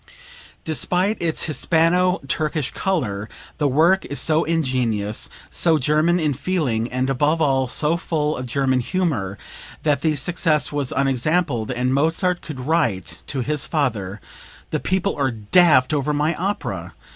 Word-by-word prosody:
Despite 180 +6 0
its 165 -2 0
Hispano 175 +4 +2
Turkish 155 -1 -1
color, 110 - -2 0.3
the 145 - +2
work 165 +8 +3
is 145 - -3
so 160 0 +2
ingenuous, 125 -10 -1 0.2
so 165 -2 +3
German 155 +5 +2
in 155 -3 +1
feeling, 125 -8 -1
and 130 +1 -1
above 145 +4 +1
all 135 -4 +2
so 150 +6 0
full 155 -3 -1
of 125 - -5
German 130 +1 +1
humor 125 - -1 0.5
that 145 -3 +1
the 155 -1 +1
success 155 +1 +1
was 145 -3 -1
unexampled, 135 -2 0
and 125 +1 0
Mozart 165 +5 +1
could 145 -5 -7
write 115 - -1
to 135 - -3
his 145 +3 -1
father: 110 - -1 0.5
"The - - 0
people 190 +1 -1
are 140 -2 +1
daft 130 - +4
over 150 0 0
my 150 +3 +1
opera." 195 +4 -4
150 Hz, 145 wpm, -21 LUFS, 130-165 Hz, 0.5 s, daft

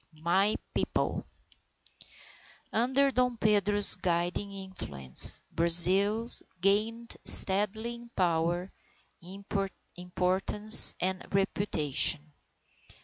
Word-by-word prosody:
II 155 - -26
My 190 +5 -3 0.2
People - - -7 1.5
Under 265 +4 -3
Dom 250 -1 -5
Pedro's 205 -1 0
guiding 180 +2 -7
influence, 180 - +5
Brazil 185 +7 +3 0.3
gained 220 +5 -5
steadily 210 +4 0
in 235 0 -17
power, 175 +1 -6 1.2
importance, 185 +4 +3
and 185 0 -7
reputation. 155 -6 -5
195 Hz, 75 wpm, -24 LUFS, 175-215 Hz, 1.5 s, influence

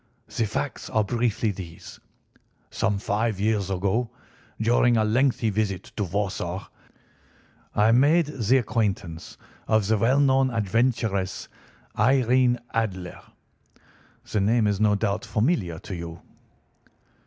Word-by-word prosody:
"The 115 - +1
facts 130 +6 -4
are 110 - +2
briefly 115 0 0
these: 85 -4 -10 0.7
Some 105 -2 0
five 105 +1 -1
years 105 -2 0
ago, 100 +5 0 0.5
during 120 +1 +3
a 110 - +3
lengthy 115 0 +1
visit 100 -2 -2
to 105 - -1
Warsaw, 95 0 -3 1.1
I 105 +2 +4
made 145 +8 +4
the 130 -4 +1
acquaintance 100 -8 -2 0.3
of 110 -2 +2
the 110 +1 +1
well 130 +6 +3
known 135 -1 +3
adventuress, 110 -3 -1 0.5
Irene 125 +1 +3 0.2
Adler. 95 -6 -3 1.1
The 105 - +1
name 110 +3 +2
is 100 -2 0
no 105 -1 +3
doubt 100 -1 -1
familiar 105 - 0
to 95 - -7
you." 85 -1 -7
110 Hz, 120 wpm, -25 LUFS, 100-120 Hz, 1.1 s, I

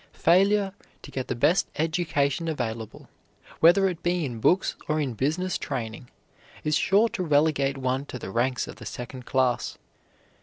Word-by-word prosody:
Failure 195 +3 +3 0.3
to - - -10
get 130 -1 -4
the - - -2
best 165 +10 +3
education 160 -1 0
available, 115 -7 -4 0.5
whether 195 +4 +6
it 175 -3 -4
be 175 -2 0
in 120 -4 -5
books 180 - +2
or 155 0 +1
in 140 -5 -1
business 160 - -1
training, 115 +1 -5 0.5
is 150 0 +1
sure 200 +7 +4
to 185 - -4
relegate 145 -4 +2
one 130 +1 -1
to - - -6
the 95 - -7
ranks 125 +3 0
of - - -9
the - - -10
second 125 +1 -7
class. 130 -2 0
145 Hz, 160 wpm, -26 LUFS, 125-175 Hz, 0.5 s, whether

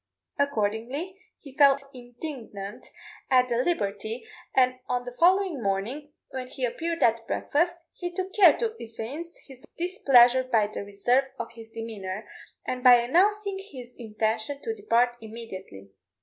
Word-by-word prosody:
Accordingly, 280 - -1 0.2
he 275 -3 -14
felt 280 -1 +5
indignant 240 -5 -8 0.4
at 255 -1 +4
the 235 - +1
liberty, 220 - -2 0.3
and 255 -1 +3
on 245 0 -1
the 245 0 -8
following 365 -4 +3
morning, 230 +10 -2 0.2
when 260 -1 -5
he 255 0 -3
appeared 330 +7 -2
at 230 0 +2
breakfast, 340 +4 0 0.2
he 350 -1 -5
took 375 +1 -4
care 410 - +7
to 455 -2 -1
evince 245 +9 -7
his 265 -2 -13
displeasure 260 -8 +5
by 230 -5 +2
the 205 0 -5
reserve 220 +7 +1
of 235 - -5
his 225 -1 -12
demeanour, 215 -3 -6 0.4
and 250 0 -3
by 250 -2 +9
announcing 385 - +2
his 255 -11 -11
intention 220 +3 -2
to 450 - -2
depart 245 - +1
immediately. 190 - -9
250 Hz, 140 wpm, -27 LUFS, 225-310 Hz, 0.4 s, by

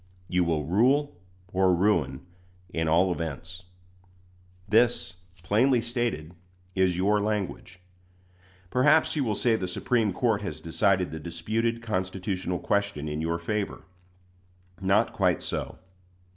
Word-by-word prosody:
You 90 0 +2
will 80 -3 0
rule 125 - +2 0.4
or 95 -1 +4
ruin 85 -8 +1 0.5
in 80 -1 -1
all 85 +4 +3
events. 85 +2 -5 1.0
This, 115 -3 +2 0.3
plainly 120 +7 +3
stated, 115 - -2 0.4
is 95 -2 +2
your 105 +3 +2
language. 100 -3 -3 0.9
Perhaps 150 +6 +4
you 145 - +1
will 110 -4 0
say 115 +2 +2
the 95 -4 -2
Supreme 110 +3 0
Court 110 +1 +1
has 80 -7 -5
decided 90 +3 +1
the 80 - -5
disputed 110 +9 -2
constitutional 95 -3 -2
question 100 -4 -1
in 75 +1 -3
your 85 +1 -1
favor. 100 +4 -3 1.0
Not 95 +2 +2
quite - - +2
so. - - -4
95 Hz, 120 wpm, -27 LUFS, 85-110 Hz, 1.0 s, or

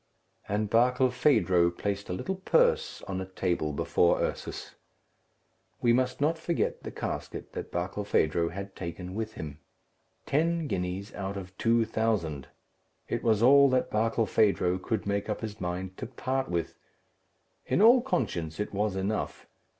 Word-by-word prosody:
And 105 +1 0
Barkilphedro 125 - +3
placed 100 +3 -4
a - - -1
little 190 - -3
purse 480 - +2
on 95 -1 -4
a - - -4
table 90 -4 -1
before 85 +4 +2
Ursus. - - -4 1.1
We 120 -1 +3
must 130 +1 +1
not 160 +3 +1
forget 170 0 -1
the - - -6
casket - - -5
that - - -6
Barkilphedro 85 -3 0
had 100 +2 -7
taken 90 +1 -6
with 110 +1 -4
him. 75 -2 -7 0.7
Ten 165 +3 +1
guineas 95 -4 -3
out 100 0 -4
of 95 -1 -8
two 115 0 +3
thousand! 105 -11 -1 0.6
It - - -2
was 110 -1 +2
all 140 +2 +7
that 130 -1 +1
Barkilphedro 110 -4 +2
could 110 - -2
make 100 +1 -1
up 105 - -2
his 110 -1 -6
mind 90 +1 -3
to - - -5
part 130 +2 -2
with. 85 -2 -3 0.9
In - - +1
all 235 +4 +7
conscience 90 - -2
it 105 - -3
was 105 0 0
enough. 100 +3 -2
105 Hz, 145 wpm, -29 LUFS, 90-125 Hz, 1.1 s, all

